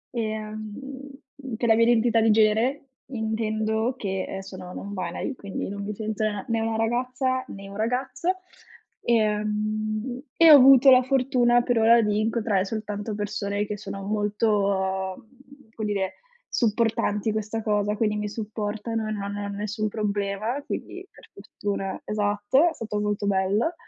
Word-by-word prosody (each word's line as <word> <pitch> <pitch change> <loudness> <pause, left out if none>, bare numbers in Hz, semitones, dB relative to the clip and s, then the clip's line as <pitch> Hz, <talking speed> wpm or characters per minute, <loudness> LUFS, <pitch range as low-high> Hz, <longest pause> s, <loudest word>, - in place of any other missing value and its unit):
Ehm, 215 -1 -4 0.8
per 235 - 0
la - - +8
mia 230 +1 +4
identità 230 -1 +3
di 225 - +3
genere 225 +6 +2 0.2
intendo 220 0 -1
che, 190 -5 -2
ehm, 195 - -5
sono 190 -2 -9
non-binary, 200 +7 -4
quindi 200 -4 -5
non 200 0 -5
mi 210 0 -4
sento 215 0 -3
n 205 -2 -2
né 230 0 +1
una 225 0 -1
ragazza 255 +3 0
né 195 0 -9
un 200 - -10
ragazzo. 260 - -1 0.7
Ehm, 215 +1 0 0.2
e 330 -1 +8
ho - - +12
avuto 270 0 +8
la 255 0 +8
fortuna 250 -2 +3
per 245 -2 +1
ora 230 +1 +6
di 210 0 +1
incontrare 215 -3 +1
soltanto 210 0 -4
persone 205 0 -2
che 210 - -4
sono 195 -1 -7
molto, 200 -2 0
mhmm, 270 -1 -20
come 215 -2 -3
dire, 190 -2 -1 0.3
supportanti 225 -2 +1
in - - 0
questa 215 +1 -3
cosa, 210 -1 +1
quindi 210 -1 +1
mi 210 0 -2
supportano 215 +1 -3
e - - -3
non 205 -2 -3
hanno 200 0 -4
nessun 215 +1 -2
problema. 210 +4 -2
Quindi, 380 +5 -6
per - - -18
fortuna 195 -2 -4
esatto, 210 +8 +2
è 330 - -6
stato 215 -5 -4
molto 210 0 -1
bello. 200 - +1
215 Hz, 155 wpm, -25 LUFS, 205-235 Hz, 0.8 s, ho